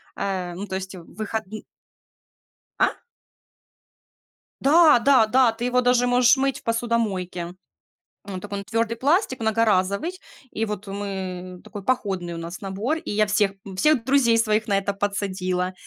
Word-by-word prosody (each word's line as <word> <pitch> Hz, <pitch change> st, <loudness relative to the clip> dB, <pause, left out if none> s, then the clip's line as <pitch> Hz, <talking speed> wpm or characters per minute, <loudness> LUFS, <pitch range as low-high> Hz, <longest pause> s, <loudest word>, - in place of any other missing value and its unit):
Э, 185 Hz, -3 st, -3 dB
ну, 195 Hz, +3 st, -5 dB
то 190 Hz, -, -4 dB
есть 190 Hz, 0 st, -5 dB
в 170 Hz, -, -11 dB
выходн 215 Hz, 0 st, -5 dB, 1.2 s
А? -, -, +3 dB, 1.7 s
Да, 305 Hz, -1 st, +6 dB
да, 255 Hz, -3 st, +5 dB
да. 250 Hz, 0 st, +4 dB
Ты 230 Hz, +2 st, -6 dB
его 250 Hz, 0 st, +2 dB
даже 245 Hz, 0 st, +3 dB
можешь 245 Hz, +1 st, +5 dB
мыть 270 Hz, 0 st, 0 dB
в -, -, -30 dB
посудомойке. 230 Hz, -6 st, -1 dB, 0.8 s
М, 200 Hz, -2 st, -7 dB
он 185 Hz, -, -4 dB
такой, 205 Hz, -1 st, -5 dB
он 200 Hz, -, -6 dB
твёрдый 230 Hz, +2 st, -1 dB
пластик, 285 Hz, -, +1 dB
многоразовый. 220 Hz, -, +1 dB, 0.4 s
И 225 Hz, -, -2 dB
вот, 210 Hz, -1 st, -5 dB
э, 195 Hz, -, -6 dB
мы 185 Hz, -2 st, -5 dB
такой 205 Hz, -1 st, -8 dB
походный 190 Hz, -9 st, -1 dB
у -, -, -6 dB
нас 170 Hz, +2 st, -7 dB
набор, 205 Hz, +11 st, -2 dB
и -, -, -7 dB
я 210 Hz, +1 st, +2 dB
всех, 205 Hz, -1 st, +2 dB
м, 190 Hz, -1 st, -8 dB
всех 290 Hz, 0 st, +3 dB
друзей 260 Hz, -4 st, +3 dB
своих 215 Hz, -1 st, +1 dB
на 200 Hz, -, +2 dB
это 200 Hz, 0 st, -2 dB
подсадила. 185 Hz, -2 st, -2 dB
210 Hz, 165 wpm, -23 LUFS, 190-245 Hz, 1.7 s, Да